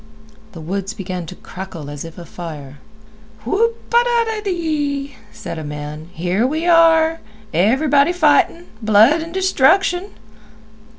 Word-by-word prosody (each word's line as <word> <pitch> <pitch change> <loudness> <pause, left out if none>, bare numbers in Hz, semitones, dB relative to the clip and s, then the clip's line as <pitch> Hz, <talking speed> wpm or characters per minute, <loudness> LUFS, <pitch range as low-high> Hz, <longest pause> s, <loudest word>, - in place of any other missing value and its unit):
The 165 - -9
woods 195 +5 -4
began 185 -4 -5
to 185 - -9
crackle 180 -6 -9
as 145 -1 -7
if 165 0 -10
afire. 155 -5 -9 0.7
"Whoop 460 - -1
a 475 0 +6 0.2
dadee," 315 -10 -2 0.2
said 220 -7 -7
a - - -6
man, 150 +2 -7
"here 180 +8 0
we 315 +4 -2
are! 330 -1 +4 0.3
Everybody 280 - +3
fightin'. 335 0 +2 0.2
Blood 220 +9 +5
an' 330 +1 -7
destruction." 375 +1 +2
260 Hz, 120 wpm, -19 LUFS, -, 0.7 s, a